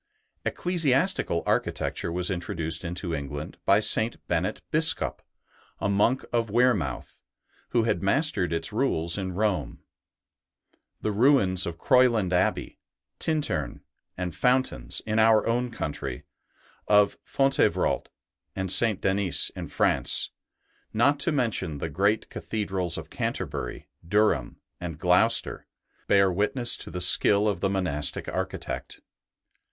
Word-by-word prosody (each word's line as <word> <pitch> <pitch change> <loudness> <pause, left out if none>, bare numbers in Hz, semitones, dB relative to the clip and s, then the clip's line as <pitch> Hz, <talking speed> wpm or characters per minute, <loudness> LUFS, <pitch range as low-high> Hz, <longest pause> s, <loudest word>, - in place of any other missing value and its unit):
Ecclesiastical 165 - +1
architecture - - -1
was 90 +2 -1
introduced 85 -2 -3
into 85 0 -3
England 75 0 -5
by - - +5
St. 110 +1 +2
Bennet 90 +4 -2
Biscop, 160 +1 +2 0.6
a - - -1
monk 105 +6 +1
of 115 -2 0
Wearmouth, 105 - 0 0.5
who 120 - +2
had 110 -6 0
mastered 100 - +1
its 85 +6 -1
rules 85 -9 +1
in 95 -2 -4
Rome. 105 0 -1 1.2
The 105 - -1
ruins 100 -5 +3
of 85 -1 -5
Croyland 120 -8 +3
Abbey, 90 - 0 0.4
Tintern, 95 - -1 0.4
and 90 -2 -3
Fountains 125 - 0
in 110 0 0
our 110 -1 +5
own 120 +2 0
country, 75 - -5 0.6
of 105 -1 +3
Fontevrault 135 0 +1 0.5
and 95 -1 -2
St. 110 -2 +3
Denis 95 -3 0
in - - -6
France, - - 0 0.6
not 140 +6 +2
to 170 - +1
mention 115 - -1
the 80 - -4
great 100 +7 +1
cathedrals 95 -5 -2
of - - -8
Canterbury, 70 +4 -4 0.2
Durham, 105 +5 +1 0.2
and 85 -4 -6
Gloucester, 90 +8 +2 0.4
bear 100 -1 +4
witness 120 +6 0
to - - -9
the 90 +1 -4
skill 100 +3 +5
of 100 -5 -1
the 95 - 0
monastic 90 -7 -1
architect. - - -5
100 Hz, 120 wpm, -26 LUFS, 85-120 Hz, 1.2 s, by